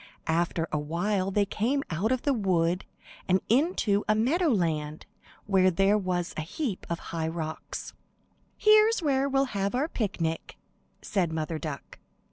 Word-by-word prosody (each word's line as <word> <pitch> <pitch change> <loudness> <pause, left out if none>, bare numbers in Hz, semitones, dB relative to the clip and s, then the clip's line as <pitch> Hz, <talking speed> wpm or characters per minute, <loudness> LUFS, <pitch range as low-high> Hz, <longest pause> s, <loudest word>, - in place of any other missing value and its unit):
After 165 0 0
a 150 - 0
while 185 +6 -1
they 205 +1 +2
came 250 +8 0
out 190 +9 0
of 255 -1 0
the 285 - +2
wood 180 -5 +1 0.4
and 185 +1 +4
into 235 - +2
a 215 - +5
meadow 300 +11 +2
land 160 - 0 0.4
where 190 -2 +4
there 195 +3 +3
was 185 -3 -1
a - - -2
heap 195 - -4
of 170 - -1 0.2
high 160 -1 -1
rocks. 160 -1 -5 0.6
"Here's 430 -1 +5
where 275 -2 +2
we'll 270 0 +2
have 200 +2 -1
our 275 +5 +1
picnic," 180 - -3 0.5
said 185 -5 0
Mother 160 0 -3
Duck. 150 -4 -7
195 Hz, 150 wpm, -28 LUFS, 165-245 Hz, 0.6 s, a